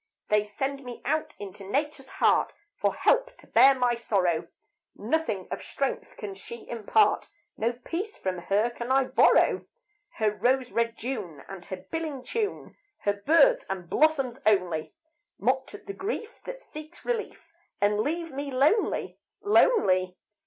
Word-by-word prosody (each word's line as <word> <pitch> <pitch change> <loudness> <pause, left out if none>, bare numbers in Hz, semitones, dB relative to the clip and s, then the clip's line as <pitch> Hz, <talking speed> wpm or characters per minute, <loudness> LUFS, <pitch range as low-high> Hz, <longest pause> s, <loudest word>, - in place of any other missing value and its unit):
They 210 0 +4
send 270 +7 -4
me 245 -2 -9
out 310 +4 -1
into 200 -1 -9
Nature's 275 +6 -2
heart - - +2 0.2
For - - 0
help - - +2
to - - -18
bear 275 0 +6
my 250 -2 +2
sorrow, 185 -8 0 0.5
Nothing 315 - -1
of - - -3
strength 275 -1 -3
can 205 -2 -6
she 220 +4 -10
impart, 235 - +2 0.3
No 230 +2 0
peace 340 - -5
from 185 -1 -3
her 205 +6 +1
can 235 +1 -5
I 270 0 +5
borrow. - - +4 0.5
Her 215 -2 +2
rose 250 +4 +1
red 230 0 0
June 185 - -5
and 190 -3 -9
her 190 - -5
billing 315 -5 -3
tune, 425 - -3 0.3
Her 205 - +1
birds 330 - +4
and 185 -3 -4
blossoms 275 -5 +2
only, 180 -7 +1 0.4
Mocked 260 - 0
at 415 - -12
the 395 - -5
grief 440 +3 -5
that - - -7
seeks 310 +2 -11
relief, 440 -8 -4 0.3
And 205 +1 +2
leave 330 +7 -1
me 280 +1 -4
lonely 280 - +1 0.2
lonely. 185 - +3
255 Hz, 150 wpm, -27 LUFS, 205-320 Hz, 0.5 s, bear